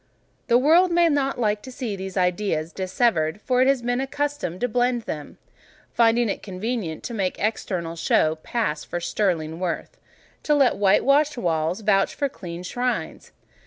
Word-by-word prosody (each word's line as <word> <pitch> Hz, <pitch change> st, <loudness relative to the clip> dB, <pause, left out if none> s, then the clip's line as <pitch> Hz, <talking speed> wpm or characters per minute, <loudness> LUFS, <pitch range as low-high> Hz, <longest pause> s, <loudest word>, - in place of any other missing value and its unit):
The 235 Hz, -, +5 dB
world 330 Hz, +7 st, +4 dB
may 340 Hz, 0 st, +4 dB
not 275 Hz, -3 st, 0 dB
like 210 Hz, -2 st, +1 dB
to 260 Hz, -, -10 dB
see 245 Hz, -5 st, -4 dB
these 190 Hz, 0 st, -6 dB
ideas 180 Hz, -3 st, 0 dB
dissevered, 185 Hz, -3 st, 0 dB
for 250 Hz, +3 st, +1 dB
it 260 Hz, -, +4 dB
has 270 Hz, -3 st, +2 dB
been 245 Hz, +2 st, 0 dB
accustomed 285 Hz, -, -3 dB
to 245 Hz, -, +2 dB
blend 245 Hz, 0 st, 0 dB
them; 150 Hz, -7 st, -7 dB, 0.6 s
finding 235 Hz, 0 st, +3 dB
it 200 Hz, -, -3 dB
convenient 195 Hz, -3 st, -4 dB
to 240 Hz, -, -5 dB
make 195 Hz, -4 st, -1 dB
external 185 Hz, -5 st, -2 dB
show 160 Hz, -1 st, +2 dB
pass 155 Hz, -3 st, -2 dB
for 175 Hz, -, -4 dB
sterling 170 Hz, -3 st, -1 dB
worth—to 185 Hz, -, -4 dB
let 275 Hz, -3 st, +3 dB
white 200 Hz, -1 st, +3 dB
washed 290 Hz, +1 st, +3 dB
walls 170 Hz, -1 st, -1 dB
vouch 195 Hz, -2 st, +2 dB
for 280 Hz, -, -1 dB
clean 175 Hz, -6 st, -8 dB
shrines. 245 Hz, +7 st, -3 dB
215 Hz, 160 wpm, -24 LUFS, 180-250 Hz, 0.6 s, The